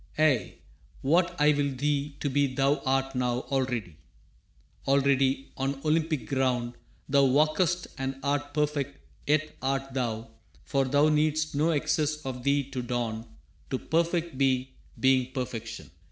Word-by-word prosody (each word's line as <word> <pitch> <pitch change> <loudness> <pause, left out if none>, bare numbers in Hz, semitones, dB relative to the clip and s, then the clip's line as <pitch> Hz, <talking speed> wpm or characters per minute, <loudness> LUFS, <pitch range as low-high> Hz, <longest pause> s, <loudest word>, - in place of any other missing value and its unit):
Ay, 150 -7 +2 0.5
what 170 +5 +2
I 150 +1 +6
will 140 -2 0
thee 145 +1 -1
to - - 0
be 145 +1 +3
thou 140 +1 +3
art 135 0 +1
now 125 -1 0
Already. 120 - -1 0.9
Already 135 -1 +2
on 135 +1 -2
Olympic 155 -5 +1
ground 125 -1 0 0.3
Thou 140 0 +4
walkest 155 +6 +2
and 135 0 -2
art 145 0 -1
perfect, 145 -2 -1 0.3
yet 155 +1 +1
art 135 0 -1
thou, 115 -3 -2 0.4
For 135 -1 +1
thou 145 +3 +3
needst 155 +1 +1
no 150 +3 +2
excess 155 0 +1
of 130 -2 -4
thee 140 +1 +2
to 130 - -3
don 115 -2 -3 0.4
To 130 - 0
perfect 170 -1 -1
be, 130 -1 +1 0.3
being 130 -1 +3
perfection. 115 - -5
135 Hz, 140 wpm, -28 LUFS, 130-150 Hz, 0.9 s, I